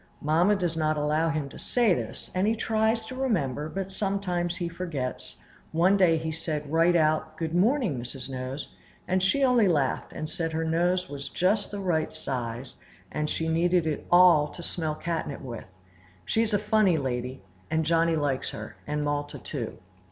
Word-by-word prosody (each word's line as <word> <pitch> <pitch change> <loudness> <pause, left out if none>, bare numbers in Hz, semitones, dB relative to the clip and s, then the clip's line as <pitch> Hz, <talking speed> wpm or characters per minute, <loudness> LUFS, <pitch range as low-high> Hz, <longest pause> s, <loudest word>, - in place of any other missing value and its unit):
Mamma 170 +7 +3
does 175 -4 -1
not 155 -1 +1
allow 150 +2 +1
him 155 -3 -1
to - - -11
say 235 -6 +2
this, - - -5
and 185 +2 +1
he 225 - +2
tries 220 0 +1
to 220 - -7
remember, 165 - -1
but 195 +2 -4
sometimes 185 -4 -1
he 175 -1 -3
forgets; 165 -8 -4 0.4
one 175 +5 +4
day 180 -4 +4
he 160 0 -3
said 155 -2 -4
right 165 +2 +4
out, 155 -1 +1
"Good 160 0 -3
morning, 200 - +2
Mrs. 125 +2 -6
Nose!" 130 +1 -5 0.4
and 185 +1 +1
she 275 +9 +2
only 245 -5 +5
laughed, 145 -7 0
and 155 - -5
said 165 +1 -3
her 160 +1 -1
nose 175 +3 +1
was 140 0 -6
just 200 +4 +1
the 205 - -5
right 175 -5 0
size, 125 -4 -5 0.3
and 150 0 -2
she 160 - -1
needed 170 +1 +2
it 155 -2 -3
all 175 -4 +7
to 175 - -10
smell 160 -3 -3
catnip 165 -3 -3
with. 120 -4 -7 0.6
She 225 - +1
is 220 -2 +1
a - - +5
funny 210 -4 +3
lady, 125 -3 -3 0.3
and 160 0 +1
Johnny 165 +1 +3
likes 145 -4 0
her, - - -8
and 150 0 -1
Malta 145 0 -2
too. 125 -7 -5
165 Hz, 180 wpm, -27 LUFS, 150-185 Hz, 0.6 s, all